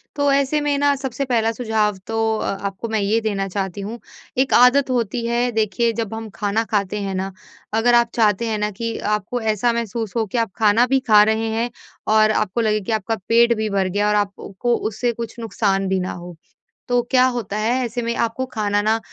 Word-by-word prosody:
तो 285 -1 +2
ऐसे 280 +2 +1
में 290 -1 0
न 285 0 +4
सबसे 265 +1 -3
पहला 230 -3 +1
सुझाव 220 -4 0
तो 225 0 0
अ - - -2 0.2
आपको 195 +4 -7
मैं 220 -1 0
ये 205 +3 +1
देना 200 -3 -1
चाहती 195 0 -4
हूँ 225 +4 -6 0.4
एक 260 +1 +2
आदत 255 +3 +5
होती 235 -1 -1
है 240 +1 0
देखिए 225 +1 +1
जब 225 -2 -3
हम 225 -1 -6
खाना 210 +1 0
खाते 205 -1 0
हैं 195 -1 -3
ना 190 +1 -3 0.4
अगर 235 +2 +3
आप 235 -1 +4
चाहते 225 0 +2
हैं 220 - -1
ना 210 0 -1
कि 230 +3 -4 0.2
आपको 230 +5 -5
ऐसा 220 +2 +1
महसूस 230 -2 -3
हो 225 -1 +1
कि 215 +4 -4
आप 230 -4 0
खाना 220 +3 +4
भी 270 +1 +2
खा 210 -1 +7
रहे 225 0 -1
हैं 230 +2 -1 0.5
और 215 0 +5
आपको 215 +2 0
लगे 215 -1 +1
कि 200 - -5
आपका 220 0 -1
पेट 235 +1 +5
भी 220 -1 -1
भर 195 -1 0
गया 205 +3 0
और 210 - +2
आपको 205 -1 -2
को 240 -1 +2
उससे 230 +3 -1
कुछ 230 0 -6
नुकसान 195 -4 0
भी 190 0 +1
ना 185 - -3
हो। 175 -1 -9 0.5
तो 245 0 +2
क्या 255 -1 +5
होता 210 -3 -4
है 220 +3 +1
ऐसे 240 +1 -3
में 235 0 -2
आपको 230 +3 -2
खाना 205 -2 0
न 225 +1 +3
225 Hz, 220 wpm, -21 LUFS, 210-235 Hz, 0.5 s, खा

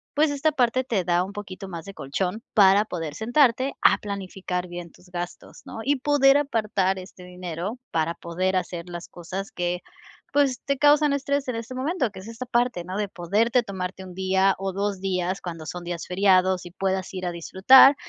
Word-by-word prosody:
Pues 295 0 +3
esta 285 +2 +1
parte 255 -2 +2
te 220 -7 0
da 175 0 +2
un 195 - -6
poquito 195 -1 -7
más 170 -3 -7
de 195 - -8
colchón 180 +8 -3
para 200 -1 +6
poder 165 -6 -4
sentarte 255 - +2
a - - +5
planificar 190 -2 -4
bien 175 -1 -8
tus 180 - -20
gastos, 175 0 -7
¿no? - - -8
Y 285 0 +2
poder 280 0 +5
apartar 210 -8 0
este 185 0 -12
dinero 180 +4 -5
para 165 +1 0
poder 185 +3 -2
hacer 175 -1 -4
las 175 0 -7
cosas 185 +3 -6
que, 175 0 -2 0.5
pues, 280 -3 +2
te 280 0 0
causan 295 +1 +5
estrés 280 0 -1
en 250 - -2
este 230 +2 -6
momento. 265 -1 0
Que 190 - -10
es 190 - -11
esta 230 +2 -6
parte, 240 -7 +1
¿no? 185 +3 -5
De 210 -1 0
poderte 215 +8 +1
tomarte 190 -2 -5
1 185 -1 -10
día 190 +1 +2
o 195 -1 -3
2 200 -1 -1
días, 185 -1 -1
cuando 165 -3 -6
son 175 +1 -6
días 175 -1 -4
feriados, 185 -1 +3
y 175 - -9
puedas 190 0 -2
ir 185 -1 -4
a - - -1
disfrutar. 195 - +7
190 Hz, 195 wpm, -25 LUFS, 180-240 Hz, 0.5 s, disfrutar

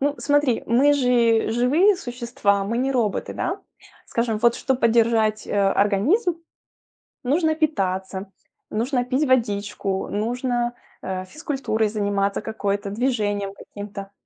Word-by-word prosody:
Ну 285 +1 +1
смотри, 290 -4 +2
мы 265 +5 +4
же 240 -5 +3
живые 295 - +3
существа, 235 - -1
мы 230 +4 -2
не 265 +2 0
роботы, 230 -6 -1
да? - - -2 0.5
Скажем, 230 -2 -1
вот 235 +1 +3
чтоб 265 -2 -1
поддержать, 225 -2 +2
э, - - -5
организм, 210 - +2 0.9
нужно 315 +4 +2
питаться, 190 - -2 0.4
нужно 245 +3 0
пить 260 +4 0
водичку, 205 -5 0
нужно, 240 +2 -1 0.3
э, 185 0 -4
физкультурой 265 - -2
заниматься 200 -1 -1
какой-то, 205 -2 -2
движением 205 -3 -1
каким-то. 200 0 -9
230 Hz, 120 wpm, -23 LUFS, 205-260 Hz, 0.9 s, мы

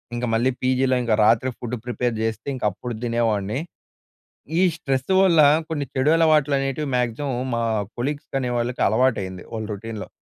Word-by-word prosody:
ఇంక 120 +1 -2
మళ్ళీ 120 +4 +2
పీజీలో 130 0 +2
ఇంకా 115 -2 +2
రాత్రి 115 +4 +3
ఫుడ్ 120 0 -4
ప్రిపేర్ 125 -1 -1
చేస్తే, 110 0 -3
ఇంక 130 - -8
అప్పుడు 120 +5 -6
తినేవాడిని. 115 -2 0 1.0
ఈ - - +4
స్ట్రెస్ 135 -3 -2
వల్ల, 170 -4 +5 0.3
కొన్ని 145 -3 -2
చెడు 130 +3 +2
అలవాట్లు 155 -3 +3
అనేటివి 135 +2 -2
మాక్సిమం 125 +3 -1 0.2
మా 115 - 0 0.3
కొలీగ్స్ 145 +4 -3
అనే 125 -1 -2
వాళ్ళకి 120 +1 -1
అలవాటయింది. 100 -5 0
వాళ్ళ 110 -1 -4
రొటీన్‌లో. 110 +1 -7
125 Hz, 155 wpm, -23 LUFS, 115-135 Hz, 1.0 s, వల్ల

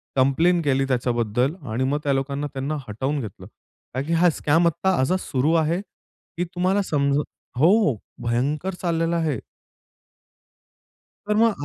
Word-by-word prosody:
Complain 160 +7 +3
केली 135 -2 +1
त्याच्याबद्दल 120 +2 0 0.2
आणि 120 +4 0
मग 140 +3 0
त्या 140 - +1
लोकांना 140 +2 -1
त्यांना 140 +3 -2
हटवून 130 +8 -2
घेतलं. 105 -6 -8 0.5
का 130 - -1
की 155 +4 -2
हा 175 +2 +5
स्कॅम 165 +2 +2
आत्ता 170 +3 +1
आज 130 +7 +2
सुरु 140 -1 0
आहे, 170 +4 0
की 175 -3 -9
तुम्हाला 185 +3 +2
समजून 145 -3 +1 0.4
हो, 170 - +4 0.3
भयंकर 140 +10 0
चाललेला 170 -1 0
आहे. 155 -7 0 1.9
तर 210 - +2
मग 220 -9 +2
145 Hz, 140 wpm, -23 LUFS, 130-170 Hz, 1.9 s, हा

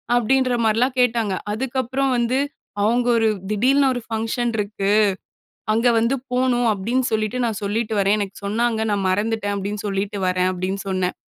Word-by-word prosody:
அப்டின்ற 255 +2 +2
மாரிலாம் 245 +4 +1
கேட்டாங்க. 230 -4 +1 0.2
அதுக்கப்புறம் 260 +3 -1
வந்து 240 +2 +1 0.5
அவங்க 240 +3 +2
ஒரு 225 -1 +3 0.2
"திடீல்னு 265 +6 +3
ஒரு 245 - -4
ஃபங்க்ஷன் 225 +2 -1
இருக்கு, 205 -1 -1 0.8
அங்க 230 +3 +2
வந்து 230 +4 +2 0.2
போணும் 250 -1 +2
அப்டின்னு 230 +6 -1
சொல்லிட்டு, 215 +2 -1
நான் 225 -3 -2
சொல்லிட்டு 220 +2 -1
வரேன். 200 +1 +3
எனக்கு 200 -2 -4
சொன்னாங்க, 225 +2 0
நான் 200 -2 0
மறந்துட்டேன்." 205 +1 0
அப்டின்னு 200 +1 -4
சொல்லிட்டு 200 +1 -2
வரேன் 185 0 +1
அப்டின்னு 185 +2 -3
சொன்னேன். 185 -1 -1
225 Hz, 150 wpm, -21 LUFS, 200-245 Hz, 0.8 s, ஒரு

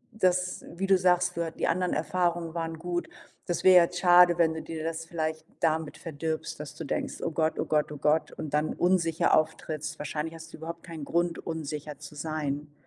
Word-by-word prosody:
das 180 -2 +1
wie 195 +1 -1
du 190 -1 +6
sagst, 180 -1 +3
dort 165 -1 -3
die - - +1
anderen 180 +1 +1
Erfahrungen 170 +2 0
waren 165 -1 -3
gut. 175 0 -2 0.4
Das 175 - -2
wäre 185 -1 +8
ja 175 - +9
jetzt 180 +1 -5
schade, 175 -1 +7
wenn 160 -1 +3
du 160 - -5
dir 160 -1 -6
das 165 0 -3
vielleicht 160 -1 -3
damit 160 -1 0
verdirbst, 160 0 -4
dass - - -7
du - - -6
denkst: - - -2
„Oh 165 - -1
Gott, 160 0 0
oh - - 0
Gott, 150 -1 +1
oh 150 - -6
Gott“, 150 +2 +2
und 155 -2 -7
dann 150 +1 +1
unsicher 170 -3 +3
auftrittst 155 -1 -2
wahrscheinlich 155 +2 -3
hast 160 0 -11
du - - -8
überhaupt 165 +1 -7
keinen 165 -4 -7
Grund, 170 +2 0
unsicher 150 -2 -5
zu 150 - -10
sein. 150 -1 -3
165 Hz, 205 wpm, -28 LUFS, 155-175 Hz, 0.4 s, ja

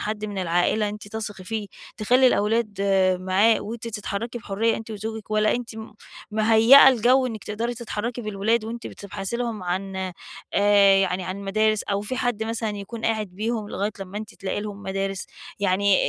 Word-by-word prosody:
حد 215 0 -3
من 205 -2 -4
العائلة 180 +4 +1
أنتِ 210 0 -8
تثقي 205 -3 -6
فيه 215 +1 -3 0.3
تخلّي 250 +5 +4
الأولاد 215 -2 +1
آآ، 190 -2 +3
معاه 190 +5 +3
وأنتِ 230 +1 -6
تتحركي 220 +2 -4
بحُرّية 225 +1 0
أنتِ 225 0 -8
وزوجِك؟ 220 0 -6
والَّا 215 0 +3
أنتِ 245 -1 -4 0.6
مهيّئة 225 +5 +7
الجو 255 +1 +4
إنِك 220 -4 -6
تقدري 230 +3 -3
تتحركي 235 +1 -4
بالولاد 215 +2 0
وأنتِ 230 +2 -6
بتبحثي 195 +2 -6
لهم 235 -5 -3
عن 190 +2 -3 0.6
آآ، 200 -1 +5
يعني 190 -1 +1
عن 185 +1 -4
مدارس، 215 +2 +1
أو 200 0 -1
فيه 210 +5 -4
حد 245 -4 -1
مثلًا 225 0 -2
يكون 210 +3 -7
قاعد 220 -2 0
بيهم 215 +3 -3
لغاية 205 +1 -2
لما 195 +1 -6
أنتِ 215 +1 -9
تلاقي 195 +1 -3
لهم 205 -1 -7
مدارس، 195 0 -3 0.3
يعني 200 0 +3
210 Hz, 170 wpm, -24 LUFS, 195-225 Hz, 0.6 s, مهيّئة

